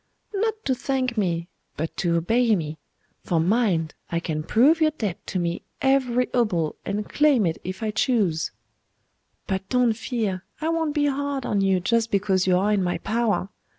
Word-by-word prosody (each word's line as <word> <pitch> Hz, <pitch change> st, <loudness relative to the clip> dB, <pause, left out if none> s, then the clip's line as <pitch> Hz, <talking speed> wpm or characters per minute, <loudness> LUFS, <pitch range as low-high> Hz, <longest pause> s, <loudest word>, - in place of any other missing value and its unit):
'Not 435 Hz, +2 st, 0 dB
to 265 Hz, -, +2 dB
thank 255 Hz, -1 st, -1 dB
me, 170 Hz, -5 st, 0 dB, 0.3 s
but 160 Hz, +2 st, -3 dB
to 170 Hz, -2 st, +1 dB
obey 225 Hz, +7 st, +3 dB
me; 155 Hz, -3 st, -4 dB, 0.4 s
for 170 Hz, -, +1 dB
mind, 175 Hz, -3 st, +1 dB, 0.2 s
I 170 Hz, -, 0 dB
can 155 Hz, -2 st, -3 dB
prove 265 Hz, -, +4 dB
your 310 Hz, -, +5 dB
debt 215 Hz, -, -5 dB
to -, -, -2 dB
me, 170 Hz, 0 st, -1 dB, 0.2 s
every 255 Hz, -2 st, +2 dB
obol, 180 Hz, -11 st, +1 dB
and 205 Hz, +1 st, -3 dB
claim 290 Hz, -8 st, +3 dB
it 165 Hz, -1 st, -1 dB
if 185 Hz, +4 st, -5 dB
I 215 Hz, -, 0 dB
choose. 205 Hz, -8 st, +1 dB, 1.0 s
But 190 Hz, -1 st, -3 dB
don't 250 Hz, -2 st, +3 dB
fear; 215 Hz, -5 st, -3 dB, 0.2 s
I 315 Hz, +2 st, -1 dB
won't 325 Hz, -2 st, 0 dB
be 295 Hz, -1 st, +2 dB
hard 285 Hz, -1 st, -1 dB
on 200 Hz, -, +1 dB
you, 195 Hz, -1 st, +3 dB
just 230 Hz, +5 st, +1 dB
because 195 Hz, -2 st, +1 dB
you 180 Hz, -1 st, +4 dB
are 200 Hz, +3 st, +2 dB
in 200 Hz, -, +2 dB
my 175 Hz, -1 st, 0 dB
power. 215 Hz, +1 st, 0 dB
210 Hz, 180 wpm, -24 LUFS, 180-255 Hz, 1.0 s, your